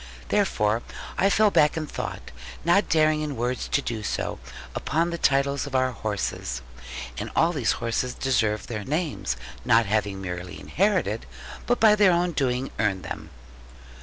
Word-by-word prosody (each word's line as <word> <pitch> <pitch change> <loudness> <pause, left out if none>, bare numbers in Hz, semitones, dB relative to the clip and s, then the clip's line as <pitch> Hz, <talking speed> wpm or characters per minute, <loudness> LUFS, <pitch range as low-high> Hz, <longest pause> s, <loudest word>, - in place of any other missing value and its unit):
Therefore, 105 +2 +2 0.3
I 195 - +3
fell 210 +1 +4
back 150 -2 +4
in 155 - -1
thought, 145 - -6 0.3
not 175 +4 +4
daring 155 -1 +3
in 150 -2 -3
words 125 +2 -2
to 140 - +1
do 115 -2 -3
so, 105 - -3 0.3
upon 165 +3 0
the 170 - -4
titles 140 0 +2
of 135 - -5
our 130 0 +3
horses. 100 - -3 0.6
And - - -4
all 165 +2 +3
these 135 -8 +1
horses 120 +2 -2
deserved 110 -5 0
their 110 -3 -4
names, 145 - -2 0.3
not 115 -1 +4
having 100 -1 0
merely 90 -1 -6
inherited, 185 - 0 0.4
but 245 - +2
by 220 -1 +7
their 205 -3 +5
own 175 +1 +2
doing 130 -3 -1
earned 95 -4 +1
them. 80 0 -6
130 Hz, 160 wpm, -25 LUFS, 105-165 Hz, 0.6 s, by